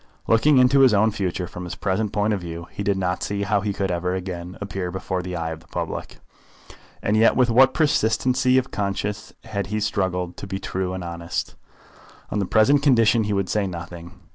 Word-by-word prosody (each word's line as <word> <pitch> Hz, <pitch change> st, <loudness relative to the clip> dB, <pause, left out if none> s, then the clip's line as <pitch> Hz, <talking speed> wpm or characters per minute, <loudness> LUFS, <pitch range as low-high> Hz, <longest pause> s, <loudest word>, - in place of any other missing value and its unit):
Looking 135 Hz, +6 st, +4 dB
into 130 Hz, +2 st, +5 dB
his 130 Hz, -5 st, +6 dB
own 110 Hz, +2 st, +3 dB
future 95 Hz, -3 st, -2 dB
from 90 Hz, +1 st, -8 dB
his 90 Hz, -, -6 dB
present 100 Hz, +2 st, -1 dB
point 105 Hz, +1 st, +1 dB
of 100 Hz, -, -2 dB
view 85 Hz, -1 st, -6 dB
he -, -, -6 dB
did 100 Hz, -1 st, +1 dB
not 90 Hz, -1 st, -1 dB
see 100 Hz, 0 st, -2 dB
how 105 Hz, 0 st, +1 dB
he 105 Hz, 0 st, -1 dB
could 95 Hz, -1 st, -2 dB
ever 90 Hz, +1 st, -1 dB
again 90 Hz, -1 st, -6 dB
appear 95 Hz, -3 st, -4 dB
before 95 Hz, 0 st, -3 dB
the 90 Hz, 0 st, -5 dB
eye 80 Hz, -1 st, -3 dB
of 80 Hz, -, -6 dB
the 80 Hz, -, -22 dB
public. -, -, -5 dB, 0.9 s
And 105 Hz, -, +1 dB
yet 110 Hz, +1 st, +5 dB
with 125 Hz, -2 st, +3 dB
what 130 Hz, +3 st, +5 dB
persistency 130 Hz, -3 st, +2 dB
of 130 Hz, 0 st, 0 dB
conscience 100 Hz, +1 st, -3 dB
had 100 Hz, -4 st, -4 dB
he 105 Hz, +2 st, -2 dB
struggled 95 Hz, -4 st, -1 dB
to -, -, -7 dB
be 95 Hz, 0 st, -3 dB
true 95 Hz, -1 st, -3 dB
and 95 Hz, -, -5 dB
honest! 85 Hz, -1 st, -4 dB, 0.8 s
On 105 Hz, -, -1 dB
the 100 Hz, -, 0 dB
present 135 Hz, +8 st, +4 dB
occasion 115 Hz, -3 st, +4 dB
he 105 Hz, -, -1 dB
would 100 Hz, -2 st, 0 dB
say 105 Hz, 0 st, 0 dB
nothing. 85 Hz, 0 st, -8 dB
100 Hz, 210 wpm, -23 LUFS, 90-110 Hz, 0.9 s, his